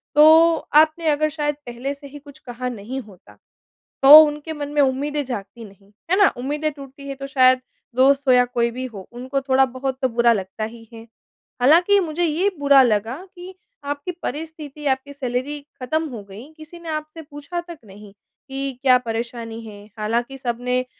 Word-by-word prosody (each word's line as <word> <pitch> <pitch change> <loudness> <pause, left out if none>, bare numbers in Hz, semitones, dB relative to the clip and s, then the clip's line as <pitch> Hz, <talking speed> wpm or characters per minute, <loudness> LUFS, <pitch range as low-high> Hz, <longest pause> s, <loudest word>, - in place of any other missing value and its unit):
तो 320 +2 +7 0.3
आपने 315 +1 -1
अगर 305 +1 +1
शायद 295 -1 -2
पहले 245 +3 -5
से 280 0 -13
ही 290 +1 -11
कुछ 285 -1 -16
कहा 250 0 -6
नहीं 240 +3 -6
होता, 205 -6 -17 0.7
तो 290 +3 +12
उनके 300 +1 -5
मन 295 -2 -5
में 295 - +3
उम्मीदें 285 +2 0
जागती 230 -1 -7
नहीं। 200 0 -19 0.2
है 375 - +4
ना? 400 -2 +6
उम्मीदें 295 +5 -2
टूटती 280 -1 -12
हैं, 275 - -5
तो 275 0 -6
शायद 255 -2 +4 0.3
दोस्त 275 +2 +3
हो 255 - +6
या 250 0 +5
कोई 235 -1 -1
भी 255 +2 -5
हो, 205 -7 -9
उनको 260 +3 -4
थोड़ा-बहुत 265 0 0
तो 260 - +1
बुरा 235 0 +3
लगता 195 +1 -5
ही 225 +1 -8
है। 225 0 -12 0.5
हालाँकि, 345 +10 +5
मुझे 345 -2 -2
ये 340 +4 +1
बुरा 280 -1 +6
लगा 225 +1 0 0.2
कि 360 +1 -10 0.3
आपकी 285 +4 -4
परिस्थिति 300 0 -7
आपकी 265 +1 -1
सैलरी 265 +2 -3 0.2
खत्म 315 +5 -1
हो 230 -6 -8
गई, 210 +10 -13
किसी 315 +2 -12
ने 335 -1 -9
आपसे 310 +1 -5
पूछा 295 +3 -7
तक 345 -2 -11
नहीं 200 0 -14 0.4
कि 270 0 -3
क्या 255 -2 +5
परेशानी 230 -1 -5
है? 205 -1 -11
हालाँकि 235 +5 -2
सबने 250 0 -2
270 Hz, 180 wpm, -21 LUFS, 240-300 Hz, 0.7 s, तो